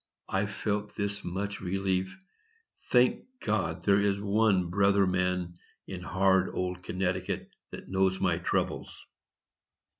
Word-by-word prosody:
I 95 +2 +1
felt 105 0 -3
this 100 0 -2
much 100 +3 -3
relief,—"Thank 125 - -1
God 95 - -1
there 100 0 +4
is 100 -1 +1
one 100 -3 +2
brother 100 +1 +4
man 90 -1 -1 0.3
in 95 -2 -6
hard 95 +1 +2
old 90 0 -2
Connecticut 90 0 -2 0.2
that - - -9
knows 95 0 +1
my 90 -3 +1
troubles." 85 - -2
95 Hz, 115 wpm, -29 LUFS, 90-100 Hz, 0.3 s, there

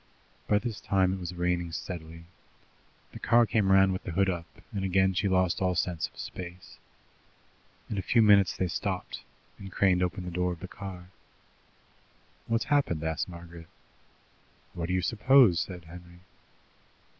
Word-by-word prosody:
By 105 - +3
this 115 0 -4
time 95 -1 +2
it 95 - -4
was 90 0 -6
raining 90 -1 -1
steadily. 85 -1 -7 0.9
The - - -10
car 120 0 +4
came 105 -2 +1
round 95 0 +5
with 95 - -5
the 85 - -5
hood 95 +2 +2
up, 85 -1 -5 0.3
and 100 -2 -2
again 95 0 +2
she 95 +2 0
lost 95 -1 +1
all 90 -1 +1
sense 85 -2 -1
of - - -25
space. 90 0 -9 1.1
In 105 - -3
a - - -1
few 115 +5 +3
minutes 100 -3 +5
they 95 - 0
stopped, 85 - -4 0.4
and 95 -1 -9
Crane 90 -1 +2
opened 90 0 -2
the 90 - -5
door 90 +1 -1
of 85 - -11
the 95 - -7
car. 90 -2 -9 1.4
"What's 115 0 0
happened?" 140 - +1
asked 80 +3 -2
Margaret. 85 -1 -11 1.1
"What 85 -1 -4
do 90 - -2
you 90 - 0
suppose?" 115 -3 +5
said 90 -2 -5
Henry. 85 +1 -13
90 Hz, 165 wpm, -28 LUFS, 85-95 Hz, 1.4 s, round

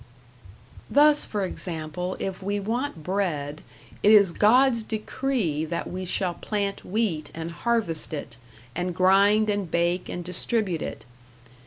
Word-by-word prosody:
Thus, 295 +1 +5
for 205 -2 -2
example, 180 0 -5
if 190 -1 -4
we 200 +2 -1
want 225 - -3
bread, 160 -5 -2 0.4
it 210 - +5
is 200 -4 +7
God's 235 +5 +4
decree 215 - -2
that 170 +1 -3
we 185 +1 -5
shall 180 0 -1
plant 200 +1 -3
wheat 185 -7 -1
and 165 +1 -5
harvest 215 -5 0
it, 145 -6 -5 0.4
and 180 -1 -2
grind 200 +4 +4
and 205 -4 -1
bake 170 +2 0
and 175 - -4
distribute 180 0 -1
it. - - -6
190 Hz, 135 wpm, -25 LUFS, 170-215 Hz, 0.4 s, is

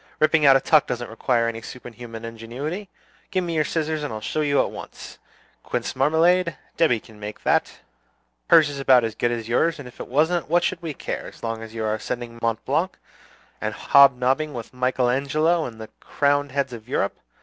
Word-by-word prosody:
Ripping 155 -1 +4
out 135 - +8
a - - +6
tuck 155 +2 +4
doesn't 120 -1 -4
require 115 +1 +1
any 115 0 -4
superhuman 115 -1 -9
ingenuity! 130 - -6 0.4
Give 185 -1 0
me 170 -1 -3
your 155 -1 +2
scissors, 155 -1 -2
and 145 - -4
I'll 110 - -4
show 155 +8 -2
you 145 -2 +2
at - - +1
once. - - -10 0.4
Quince - - -3
marmalade? 170 +4 +3 0.2
Debby 155 -9 +3
can 110 0 -17
make 105 0 -8
that. - - +2 0.8
Hers 155 - +7
is 145 -1 -5
about 130 -3 +5
as 115 -1 -2
good 120 - 0
as 115 -2 -3
yours; 160 +8 +2
and 140 -4 -9
if 125 - -15
it - - -6
wasn't, 160 +6 +1
what 175 +1 +3
should 175 -1 -1
we 160 -4 -5
care, - - -5
as - - -14
long 115 -1 -3
as 115 0 -10
you 110 - -3
are 110 0 0
ascending 115 +1 -5
Mont 115 -1 -1
Blanc, - - 0 0.6
and - - -2
hob 140 -2 +6
nobbing 135 +4 0
with 115 0 -7
Michael 125 0 +1
Angelo 155 +6 +1
and 115 -2 -8
the 110 -1 -8
crowned 145 -1 0
heads 135 -2 -1
of 115 0 -10
Europe? 100 - -1
130 Hz, 205 wpm, -23 LUFS, 115-155 Hz, 0.8 s, out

